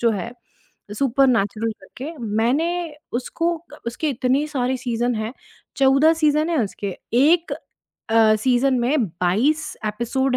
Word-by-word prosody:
जो 235 -1 +3
है 220 +3 -3 0.6
सुपरनैचुरल 230 -4 +2
करके, 260 +10 -8
मैंने 290 +10 0 0.2
उसको 330 +8 -1 0.4
उसके 240 +7 -2
इतनी 260 +3 +1
सारी 260 -2 -1
सीज़न 240 -1 -1
हैं। 220 +1 -3 0.4
14 275 +4 +5
सीज़न 305 0 +2
हैं 330 - +1
उसके। 200 -1 -5 0.2
एक 320 +7 +4 0.6
अ, 225 -1 +5
सीज़न 255 +3 +2
में 255 +1 +2
22 210 - 0
एपिसोड 250 +4 0
255 Hz, 120 wpm, -22 LUFS, 225-295 Hz, 0.6 s, 14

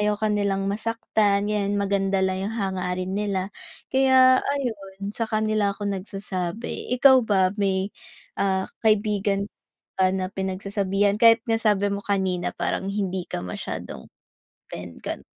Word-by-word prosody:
ayaw 210 0 +1
ka 215 - +1
nilang 195 -1 0
masaktan, 210 -1 0
yan 205 -1 0
maganda 195 -1 +1
lang 190 0 -1
yung 225 - -5
hangarin 185 -2 -2
nila. 195 -2 -1 0.4
Kaya 260 -1 +6
ayon 205 -8 -4
sa 230 0 -3
kanila 215 -2 +1
ako 205 - -6
nagsasabi. 195 +2 -4
Ikaw 265 +1 +7
ba 190 -2 +3
may, 195 0 0 0.5
ah, 190 -1 +1 0.2
kaibigan 205 -2 +2
ka - - -59 0.5
ba 190 - +5
na 185 -1 -1
pinagsasabihan 195 +1 0
kahit 230 -1 +7
nga 225 - +3
sabi 205 -2 +2
mo 200 - -2
kanina 190 -3 0
parang 190 - -2
hindi 190 -3 -2
ka - - -3
masyadong 90 -7 -6 0.6
open, 85 -1 -8
ganun? - - -5
200 Hz, 140 wpm, -24 LUFS, 190-215 Hz, 0.6 s, Ikaw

